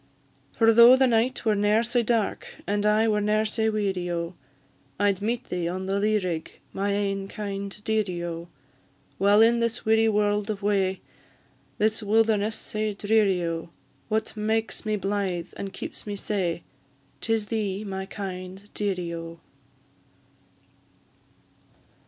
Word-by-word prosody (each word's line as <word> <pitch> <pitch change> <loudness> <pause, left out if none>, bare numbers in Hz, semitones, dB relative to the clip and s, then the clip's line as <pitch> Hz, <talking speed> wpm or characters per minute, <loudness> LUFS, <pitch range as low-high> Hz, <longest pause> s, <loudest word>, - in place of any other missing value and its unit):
For 225 -1 +4
though 235 +2 +9
the 265 0 +4
night 240 +1 +1
were 220 - +4
ne'er 210 +2 +3
sae 240 +1 +1
dark, 230 -2 -1
And 205 +1 0
I 215 +1 +4
were 210 -1 +2
ne'er 215 +1 +2
sae 220 +1 0
weary, 195 -4 -1
O! 170 0 -2 0.7
I'd 200 -1 +2
meet 235 +4 -2
thee 175 -2 -1
on 185 +2 -3
the 195 +1 0
lea 215 +1 +2
rig, 175 -5 -3 0.2
My 200 +1 -1
ain 195 -1 -1
kind 200 -1 -4
dearie, 205 -6 -1
O! 170 0 -5 0.7
While 205 +2 +6
in 235 +1 +4
this 230 0 -1
weary 220 0 +4
world 210 0 +1
of 205 -1 -3
wae, 195 -2 +1 0.8
This 215 +1 +1
wilderness 215 0 +2
sae 215 -1 -3
dreary, 205 -3 +2
O! 165 0 -3 0.4
What 220 0 -1
makes 220 +1 -1
me 215 - +1
blythe, 195 -4 -2
and 195 -1 -5
keeps 190 - -8
me 205 - -3
sae? 185 -4 -2 0.6
'Tis 225 -2 0
thee, 210 -3 -2
my 190 -1 -5
kind 190 0 -7
dearie, 180 -5 -2
O! 165 0 -7
205 Hz, 145 wpm, -26 LUFS, 190-220 Hz, 0.8 s, though